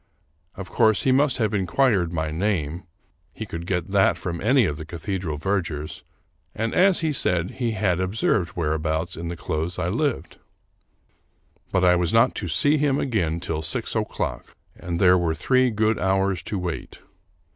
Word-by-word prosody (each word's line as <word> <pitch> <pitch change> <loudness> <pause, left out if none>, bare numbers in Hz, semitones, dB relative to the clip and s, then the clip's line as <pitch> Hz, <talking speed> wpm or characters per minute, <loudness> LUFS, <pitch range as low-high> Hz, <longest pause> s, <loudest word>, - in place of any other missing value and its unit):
Of 95 -1 -7
course, 110 -3 +3
he 130 - +3
must 135 +1 +3
have 110 -3 0
inquired 95 -2 +1
my 80 -2 -2
name 85 -2 -2 0.2
— - - -42
he - - -5
could 85 +1 -7
get 95 0 -2
that 100 -1 +3
from 85 -2 -5
any 125 +2 +4
of 75 -5 -2
the 80 - -6
cathedral 85 -1 -4
vergers 80 -4 -3 0.3
— - - -43
and, 115 +1 -2
as 185 -1 +4
he 160 -2 0
said, 90 -8 +1
he 120 -3 -2
had 100 -5 0
observed 95 -1 0
whereabouts 80 +1 -1
in 85 +1 -6
the 85 0 -5
close 80 +2 -3
I 85 - -1
lived. 130 +6 -2 1.3
But 95 0 +2
I 90 0 +5
was 85 -2 +1
not 115 +3 +4
to - - -4
see 145 +1 +3
him 140 -1 +1
again 90 - -1
till 80 -2 -3
six 80 +1 -2
o'clock, - - -3 0.2
and 85 -1 -4
there 90 -1 +5
were 80 -2 0
three 130 +6 +2
good 110 0 +1
hours 95 -1 +1
to 105 - -2
wait. 90 -3 -5
95 Hz, 180 wpm, -24 LUFS, 85-110 Hz, 1.3 s, I